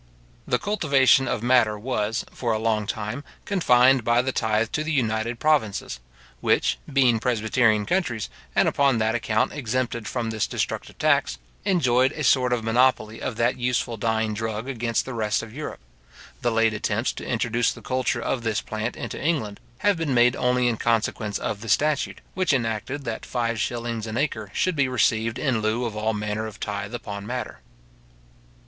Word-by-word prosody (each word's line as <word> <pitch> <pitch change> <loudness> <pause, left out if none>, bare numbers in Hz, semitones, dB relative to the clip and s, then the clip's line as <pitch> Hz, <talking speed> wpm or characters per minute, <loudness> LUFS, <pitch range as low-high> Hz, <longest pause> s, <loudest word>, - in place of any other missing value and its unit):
The 125 - +2
cultivation 140 -10 +3
of 115 - -2
madder 120 -4 +3
was, 115 -1 -2
for 120 -3 -1
a - - +1
long 110 -2 0
time, 110 +5 -4 0.2
confined 130 - +4
by 120 +2 +3
the 130 - -1
tythe 110 -2 0
to 155 - -1
the 155 - -3
United 115 -3 0
Provinces, 110 - 0 0.4
which, - - +1
being 130 -4 +4
presbyterian 110 -2 +2
countries, 145 - -1 0.3
and - - +4
upon 140 -3 +3
that 110 0 +1
account 110 -1 0
exempted 125 -4 -2
from 115 -3 -2
this 110 -1 -1
destructive - - -3
tax, - - +2 0.3
enjoyed 130 -8 +3
a 155 - -4
sort 130 -2 +3
of 120 -2 0
monopoly 115 -1 +2
of - - -3
that 120 +3 +1
useful 120 -1 0
dyeing 110 0 0
drug 110 +2 -3
against 120 -3 -1
the 130 - -6
rest 110 -1 0
of 110 -1 -10
Europe. 150 +4 -6 0.6
The 120 - +2
late 115 -1 +3
attempts 105 +2 -1
to - - -8
introduce 120 -1 +1
the - - -11
culture 130 -2 -1
of 130 - -1
this 110 -2 0
plant 110 +2 -4
into 120 - -6
England, 140 -11 -1 0.2
have 205 +3 +2
been 155 -5 -1
made 120 +1 +5
only 125 0 +2
in 115 -2 0
consequence 110 -2 0
of 105 - -4
the 115 - -7
statute, 150 +5 +1
which 185 -4 +1
enacted 120 +3 -2
that 115 -1 -4
five 115 -2 -2
shillings 115 0 -2
an 110 +1 -4
acre 110 -8 -1
should 185 - 0
be 140 -3 +2
received 115 -2 +1
in 125 -6 0
lieu 110 +3 0
of 110 -3 -4
all 110 +1 -1
manner 105 +1 -2
of 110 - -10
tythe 100 +2 -4
upon 100 -3 -6
madder. 125 +1 -4
115 Hz, 180 wpm, -24 LUFS, 110-130 Hz, 0.6 s, made